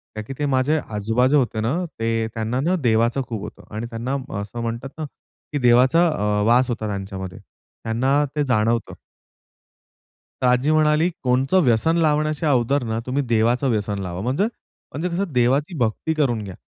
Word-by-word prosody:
का 110 - -4
की - - -5
ते 145 - 0
माझे 140 +3 +2 0.2
आजोबाजे 115 +7 +2
होते 120 -4 0
ना 115 +7 0 0.2
ते 115 0 0
त्यांना 115 +2 -2
ना 175 +6 +1
देवाचं 115 +2 +2
खूप 110 -4 -4
होतं 105 - -9
आणि 110 +2 -3
त्यांना 120 +4 -3 0.3
असं 110 +4 -6
म्हणतात 115 +3 -4
ना 155 - -2 0.5
की - - +1
देवाचा 130 +7 +5
अ, 105 -8 0
वास 125 +2 +4
होता 110 -2 -2
त्यांच्यामध्ये, 95 -2 -5 0.5
त्यांना 130 +6 +2
ते 150 - +1
जाणवतं. 115 -1 +1 1.5
तर - - +3
आजी 125 +4 +3
म्हणाली 155 +1 +3
कोणतं 130 +8 +2
व्यसन 125 +7 +3
लावण्याच्या 155 0 +1
अगोदर 135 +2 +2
ना 110 -1 -2
तुम्ही 135 +3 0
देवाचं 120 +3 +2
व्यसन 105 -2 -1
लावा. 90 -2 -5
म्हणजे 130 - 0 0.5
म्हणजे 160 +6 -2
कसं 180 0 -2
देवाची 135 +7 +1
भक्ती 120 +7 0
करून 130 -8 0
घ्या. 95 -2 -8
125 Hz, 165 wpm, -22 LUFS, 110-145 Hz, 1.5 s, देवाचा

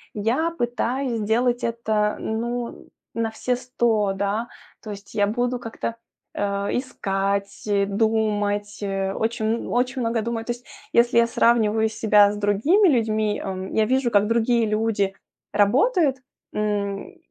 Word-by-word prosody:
я 235 +11 +1
пытаюсь 245 -2 -1
сделать 240 +3 +1
это, 220 -2 0
ну, 235 +2 -4 0.2
на 230 -1 -1
все 250 +3 -1
100, 235 -5 0
да. 200 +4 -2 0.3
То 215 - -9
есть 200 0 -10
я 205 -1 +3
буду 245 +3 -1
как-то, 230 0 -5 0.4
э, 200 0 -1
искать, 200 -5 -2 0.2
думать, 205 -1 0
очень 215 +4 -1
очень 250 +1 0
много 230 -1 0
думать. 225 0 -3
То 240 - 0
есть 240 0 -15 0.3
если 235 0 +3
я 235 - +4
сравниваю 220 -2 +3
себя 210 -2 +4
с - - -5
другими 255 - +3
людьми, 220 -5 +1
м, 190 -1 -5
я 220 - +3
вижу, 260 +1 +1
как 205 -1 +4
другие 230 0 +2
люди 215 -2 0 0.4
работают, 270 - +3 0.4
м. 205 - -2
220 Hz, 130 wpm, -23 LUFS, 205-240 Hz, 0.4 s, я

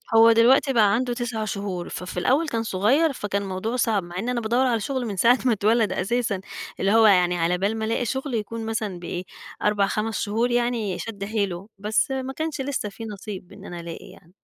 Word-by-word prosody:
هو 225 +1 +8
دلوقتي 255 +4 +5
بقى 210 -4 +4
عنده 245 +1 0
9 235 -3 -3
شهور، 200 -4 -4
ففي 180 0 -6
الأول 285 - +2
كان 230 -4 -1
صغير، 255 - +2
فكان 200 -3 -2
الموضوع 195 +5 -3
صَعب 220 -6 +1
مع 175 +1 -7
إنّي 240 +4 -1
أنا 240 -1 -1
بادوّر 240 +4 +2
على 230 -2 +1
شُغل 260 +2 -2
من 205 -3 -4
ساعة 245 +6 +5
ما 245 - +4
اتولد 215 0 +2
أساسًا، 205 0 -1 0.4
اللي 195 +1 +2
هو 225 0 +6
يعني 180 -3 +4
على 170 +2 +1
بال 205 +4 0
ما 220 - -2
ألاقي 230 +2 0
شُغل 265 +2 -3
يكون 225 +1 -3
مثلًا 215 -5 -3
ب - - -15
إيه 175 +1 -4 0.4
4 205 -1 +2
5 215 +1 -2
شهور 230 +4 0
يعني 235 -6 0
شَد 205 -3 -6
حيله، 200 -3 -2
بس 210 +5 0
ما 265 0 -3
كانش 315 -1 -3
لسّه 265 -6 -2
في 225 +3 -9
نصيب 200 -3 -8
إن - - -12
أنا 175 -1 -7
ألاقي 170 -1 -8
يعني. 180 -2 -19
220 Hz, 215 wpm, -24 LUFS, 195-240 Hz, 0.4 s, هو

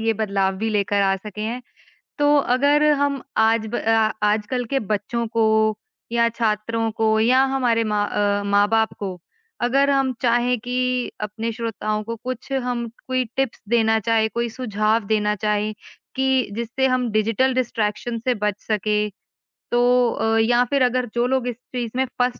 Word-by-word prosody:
ये 225 0 +1
बदलाव 195 -3 0
भी 220 +3 -2
लेकर 205 -1 +1
आ 195 0 +3
सके 210 +1 -9
हैं। 235 +4 -3 0.6
तो 290 0 +4 0.2
अगर 285 +3 +3 0.2
हम 280 -2 0 0.2
आज 225 0 +2
ब 230 +2 -3
अ, 225 -1 +2
आजकल 215 +4 0
के 275 - +3
बच्चों 230 +3 -2
को 225 -1 +4 0.7
या 235 0 +3
छात्रों 225 0 0
को 220 0 +3
या 255 +4 +4
हमारे 235 -4 +2
माँ 205 0 +1
अ, 205 0 0
माँ-बाप 205 +2 +2
को 190 -3 -5 0.4
अगर 275 +3 +3
हम 270 -2 +2
चाहें 240 0 +2
कि 250 +1 -1
अपने 220 +2 -3
श्रोताओं 215 -2 -3
को 230 +2 -5
कुछ 255 +1 -5
हम 245 -3 -2 0.2
कोई 255 0 0
टिप्स 270 -3 -2
देना 225 -1 +3
चाहें, 220 0 +2
कोई 235 0 -1
सुझाव 220 -2 0
देना 210 -1 +1
चाहें 210 0 0 0.4
कि 265 0 +1 0.3
जिससे 235 +3 -1
हम 255 -2 0
डिजिटल 225 +5 +1
डिस्ट्रैक्शन 230 -1 -1
से 250 +2 0
बच 210 -1 -1
सकें 210 0 0 0.6
तो 240 - +2 0.3
अ, 225 0 0
या 240 +2 +3
फ़िर 275 +2 +1
अगर 250 0 +1
जो 240 0 +2
लोग 260 -1 0
इस 245 - -3 0.2
चीज़ 240 -3 -2
में 260 +1 +1
फँस 245 0 +1
230 Hz, 165 wpm, -22 LUFS, 215-250 Hz, 0.7 s, तो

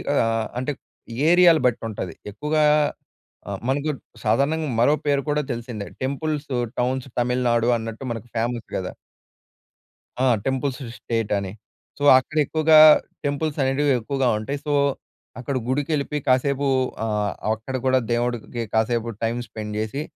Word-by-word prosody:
ఆహ్, 115 -3 +1
అంటే 130 +3 -2 0.6
ఏరియాలని 175 -4 +6
బట్టి 120 -1 -2
ఉంటది. 95 -5 -5 0.2
ఎక్కువగా 150 +6 0 0.9
ఆహ్, 100 -1 -4
మనకు 145 +3 0 0.3
సాధారణంగా 155 +2 +1
మరో 145 +5 +5
పేరు 140 -1 +2
కూడా 150 0 +1
తెలిసిందే. 115 -3 -6 0.2
టెంపుల్స్ 145 +2 -2 0.3
టౌన్స్ 130 +1 -1
తమిళనాడు 120 -1 +1
అన్నట్టు 115 +3 -6
మనకు 115 +1 -8
ఫేమస్ 115 0 -2
గదా! 95 - -3 1.3
ఆ! 130 - +3 0.2
టెంపుల్స్ 135 0 -1 0.2
స్టేట్ 115 -3 -2
అని, 95 -1 -4 0.5
సో 145 - -5
అక్కడ 155 +4 -3
ఎక్కువగా 155 +1 +5 0.5
టెంపుల్స్ 145 +1 -1
అనేటివి 135 +2 +2
ఎక్కువగా 135 +3 -1
ఉంటాయి. 140 +7 -4
సో, 150 - 0 0.7
అక్కడ 135 +2 -3
గుడికి 140 +3 -1
వెళ్ళిపోయి 150 0 -1
కాసేపు 140 +2 +2 0.4
ఆహ్, 105 -2 -1 0.2
అక్కడ 110 +4 -6
ఆహ్, 130 - -8
కూడా 130 0 +4
దేవుడికి 120 0 -2
కాసేపు 115 +1 +1
టైమ్ 115 +2 0
స్పెండ్ 105 -1 -6
చేసి, 110 +7 -3
130 Hz, 135 wpm, -23 LUFS, 115-145 Hz, 1.3 s, ఏరియాలని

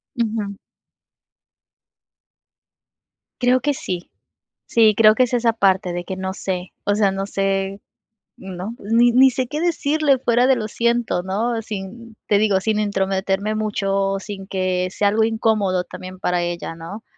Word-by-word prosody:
Ujú. 215 -4 -2 2.9
Creo 250 0 +3
que 290 0 +1
sí. 180 -8 -5 0.5
Sí, 220 -2 +4
creo 215 -1 +6
que 255 - +4
es 250 0 -3
esa 235 -1 +2
parte 190 -4 +1
de 175 0 -4
que 190 - -5
no 190 0 -3
sé 185 -1 -4
o 205 - +2
sea, 205 -1 +3
no 195 +1 -3
sé, 195 0 -1 0.6
¿no? 190 +4 -7
Ni 230 +3 +3
ni 260 +2 +6
sé 255 +1 -2
qué 300 +4 -4
decirle 305 -4 +2
fuera 245 0 +2
de 265 - +5
lo 215 -2 -3
siento, 235 -4 0
¿no? 225 +5 -1
Sin 220 +2 -8
te 205 -1 +3
digo, 205 -3 +3
sin 215 +1 0
entrometerme 195 0 -1
mucho, 210 -2 -1
o 195 0 0
sin 195 -1 -8
que 185 -1 -1
sea 200 +2 +1
algo 220 +2 +2
incómodo 215 -5 +1
también 185 +1 -10
para 180 -2 0
ella, 175 -1 -4
¿no? 170 +7 -9
205 Hz, 155 wpm, -21 LUFS, 190-230 Hz, 2.9 s, creo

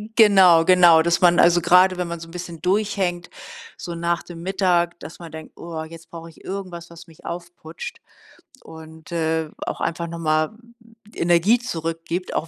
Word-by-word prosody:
Genau, 190 -7 +6
genau, 175 -2 +6
dass 170 +1 +1
man 175 -1 +4
also, 175 0 +5
grade, 180 +2 +4
wenn 180 -1 -2
man 170 -1 -6
so 165 - -10
'n - - -14
bisschen 175 -2 -8
durchhängt, 190 -2 -1 0.5
so 170 -1 -7
nach 170 0 -1
dem 170 -1 -11
Mittag, 180 -2 0
dass 160 - -10
man 170 -2 -10
denkt: 160 0 -11
„Oh, 165 -2 -6
jetzt 165 +1 -13
brauche 165 0 -10
ich 160 - -19
irgendwas, 185 -3 -7
was 170 0 -13
mich 160 -2 -19
aufputscht 175 - -8 0.6
und, 160 0 -13
äh, 160 -1 -1 0.2
auch - - -5
einfach 170 0 -2
noch 170 0 -7
mal 155 -1 +1 0.6
Energie 175 +7 +3
zurückgibt“, 165 -4 -4
auch 165 - -2
170 Hz, 175 wpm, -22 LUFS, 165-180 Hz, 0.6 s, Genau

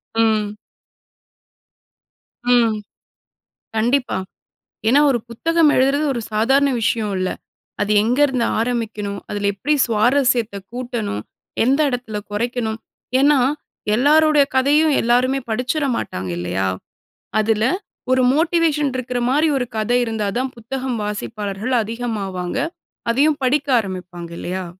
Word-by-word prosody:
ம். 215 -2 +1 2.0
ம். 230 -3 +3 1.0
கண்டிப்பா. 245 +3 +1 0.7
ஏனா 270 +5 +5
ஒரு 250 - +2
புத்தகம் 325 +6 +2
எழுதுறது, 275 +3 +3
ஒரு 240 - -3
சாதாரண 270 +6 +3
விஷய 225 0 +1
இல்ல. 185 0 0 0.5
அது 205 +1 +1
எங்கருந்து 250 +1 +2
ஆரம்பிக்கணும்? 220 -4 -2
அதுல 205 -1 -1
எப்டி 290 +10 0
சுவாரஸ்யத்த 240 -1 +2 0.2
கூட்டணும், 240 - -3 0.4
எந்த 265 +4 +3
இடத்துல 245 -4 -4
கொறைக்கணும். 225 +1 -2 0.4
ஏன்னா, 285 +1 +5 0.6
எல்லாருடைய 300 +4 +5
கதையும் 295 +3 +4
எல்லாருமே 250 +3 +2
படிச்சிட 250 +7 -1
மாட்டாங்க, 90 0 -4
இல்லையா? 90 +2 -1 0.7
அதுல, 215 0 +1 0.5
ஒரு 255 0 +4
மோட்டிவேஷன் 315 -3 +2
இருக்குற 250 -1 -2
மாரி, 300 +4 +3
ஒரு 250 - -1
கத 215 +2 -1
இருந்தாதா, 220 +1 -1
புத்தகம் 255 +2 -4
வாசிப்பாளர்கள் 210 +2 -3
அதிகமாவாங்க. 210 -4 -4 0.5
அதையும் 290 +4 +2
படிக்க 280 +3 +1
ஆரம்பிப்பாங்க, 180 -4 -6
இல்லையா? 185 +1 -4
240 Hz, 105 wpm, -20 LUFS, 210-270 Hz, 2.0 s, ஏனா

